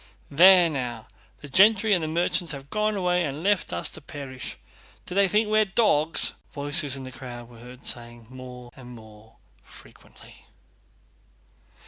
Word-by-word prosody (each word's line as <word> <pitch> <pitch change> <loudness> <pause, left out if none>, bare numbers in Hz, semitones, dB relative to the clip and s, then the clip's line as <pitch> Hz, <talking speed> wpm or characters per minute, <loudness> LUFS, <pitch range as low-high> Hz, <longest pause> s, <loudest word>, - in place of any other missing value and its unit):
"There 180 +4 +7
now, 125 -7 -5 0.4
the 145 - -9
gentry 205 +7 +4
and 160 -4 -1
merchants 175 0 0
have 140 0 -11
gone 215 0 0
away 180 -2 0
and 145 +1 -5
left 205 -1 0
us 85 - -2
to - - -6
perish. 135 -3 -8 0.5
Do - - -8
they 200 +1 +3
think 210 +3 +1
we're 215 0 +3
dogs?" 190 -7 +2 0.2
voices 145 0 +2
in 135 - -8
the 130 - -8
crowd 120 -2 -10
were 120 -2 -16
heard 125 +2 -14
saying 120 -1 -3
more 125 -1 -11
and 125 -3 -12
more 110 0 -16 0.3
frequently. - - -18
145 Hz, 150 wpm, -24 LUFS, 125-185 Hz, 0.5 s, There